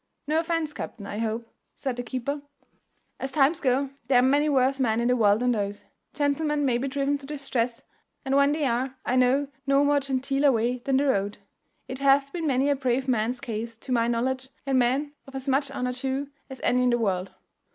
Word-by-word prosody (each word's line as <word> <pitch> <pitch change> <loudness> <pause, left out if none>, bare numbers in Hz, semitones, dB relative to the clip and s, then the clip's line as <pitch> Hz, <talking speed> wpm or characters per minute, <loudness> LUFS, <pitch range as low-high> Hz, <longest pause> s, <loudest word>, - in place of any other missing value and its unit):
"No 310 +2 +2
offence, 330 -2 -1
captain, 210 -7 -7
I 210 - -5
hope," 225 +1 -2 0.3
said 265 -3 -3
the 245 - -3
keeper; 260 +4 -3 0.8
"as 265 - -4
times 295 +2 +3
go, 265 +1 +1 0.2
there 260 - +4
are - - +6
many 285 +3 +3
worse 270 -1 +2
men 230 -3 +2
in 235 - +1
the 250 - +4
world 210 -2 +3
than 250 0 +2
those. 205 -3 -3 0.3
Gentlemen 290 0 +1
may 245 -3 +2
be 270 - -2
driven 280 +1 0
to 275 - -11
distress, 255 -5 -2 0.4
and 270 0 +1
when 280 0 +5
they 300 -1 0
are, 255 +1 -1
I 250 - +1
know 260 +3 +3 0.2
no 275 +1 +4
more 290 0 +4
genteeler 275 +1 +1
way 240 +1 0
than 270 -1 +2
the 285 - +2
road. 205 -6 0 0.5
It 260 - -6
hath 275 0 +3
been 335 -3 -2
many 270 0 +2
a - - +3
brave 260 0 0
man's 245 +1 0
case, 230 -3 -5
to 255 - -9
my 235 -2 +2
knowledge, 260 +3 -1 0.2
and 270 -2 +2
men 270 +4 +1
of 270 - -11
as 265 +1 -5
much 275 +1 +1
honour 250 -2 -2
too 270 +2 -3 0.2
as 265 -1 -9
any 250 - +3
in 250 - +3
the 240 - +3
world." 195 -5 -1
265 Hz, 215 wpm, -26 LUFS, 240-280 Hz, 0.8 s, are